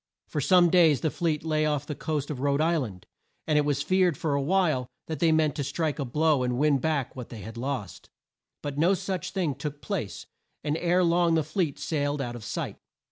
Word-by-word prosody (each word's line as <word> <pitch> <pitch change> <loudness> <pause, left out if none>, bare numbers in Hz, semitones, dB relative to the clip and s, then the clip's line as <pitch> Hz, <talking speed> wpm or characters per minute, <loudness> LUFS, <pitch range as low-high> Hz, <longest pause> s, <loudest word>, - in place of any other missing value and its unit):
For 150 - -2
some 175 +2 +5
days 165 -7 +5
the 160 - 0
fleet 160 -4 -1
lay 155 -1 +1
off 150 -1 -1
the 150 - -4
coast 150 0 -3
of 140 - -5
Rhode 140 +1 +1
Isl 160 -4 +2
and, 90 -3 -12 0.4
and 150 -1 +3
it 150 - +1
was 140 -1 0
feared 185 -5 +2
for 155 -3 -1
a 140 - +1
while 155 -5 +1 0.2
that 160 -3 -5
they 165 -1 +4
meant 155 -2 +3
to 145 - -1
strike 150 +3 -2
a 140 - -1
blow 150 +2 +2
and 125 -1 0
win 145 0 +3
back 145 -2 -1
what 125 -2 -7
they 115 -3 -8
had 110 +4 -8
lost. 125 -5 -5 0.5
But 145 0 -4
no 180 +5 +4
such 185 -1 -3
thing 185 -6 -1
took 145 +2 -6
place, 160 - -4 0.4
and 150 0 0
ere 180 +2 +2
long 170 -1 +3
the 160 - +2
fleet 155 -1 -1
sailed 145 -2 -1
out 120 -3 -3
of 120 - -8
sight. - - -4
150 Hz, 225 wpm, -27 LUFS, 140-165 Hz, 0.5 s, some